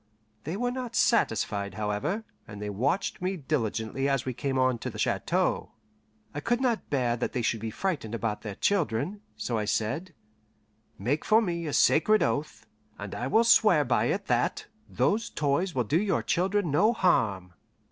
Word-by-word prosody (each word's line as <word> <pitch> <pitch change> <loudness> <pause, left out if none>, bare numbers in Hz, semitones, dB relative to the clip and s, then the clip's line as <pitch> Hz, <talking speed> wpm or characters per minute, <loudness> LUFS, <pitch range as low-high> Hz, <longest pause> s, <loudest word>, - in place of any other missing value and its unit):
They 165 +6 -3
were 245 +2 0
not 250 -2 -5
satisfied, 105 - +1
however, 105 - -2 0.2
and 100 - -9
they 105 0 -4
watched 130 - -1
me 185 +1 -1
diligently 135 -3 -1
as 135 -3 0
we 130 - -2
came 135 +1 -2
on 130 -2 +2
to - - -4
the - - -9
chateau. - - 0 0.6
I 145 - -3
could 235 +10 0
not 245 -4 -1
bear 125 -4 +1
that - - -3
they 125 - -1
should 115 0 0
be 110 +1 -4
frightened 145 - -3
about 110 -2 -2
their 105 -2 -6
children, 180 - 0
so 110 +1 -2
I 105 - -1
said: 110 - -2 0.8
"Make 130 +10 -1
for 220 - +5
me 170 -6 -2
a - - -2
sacred 215 +7 +4
oath, 150 +2 -2 0.3
and 100 -1 -7
I 125 - -3
will 220 +12 +4
swear 235 - +5
by - - +2
it - - -1
that - - 0 0.2
those 225 +3 0
toys 150 +5 0
will 125 - +2
do 155 - +1
your 205 -2 0
children 185 -1 0
no 210 +11 +4
harm." 100 - +1
145 Hz, 180 wpm, -28 LUFS, -, 0.8 s, for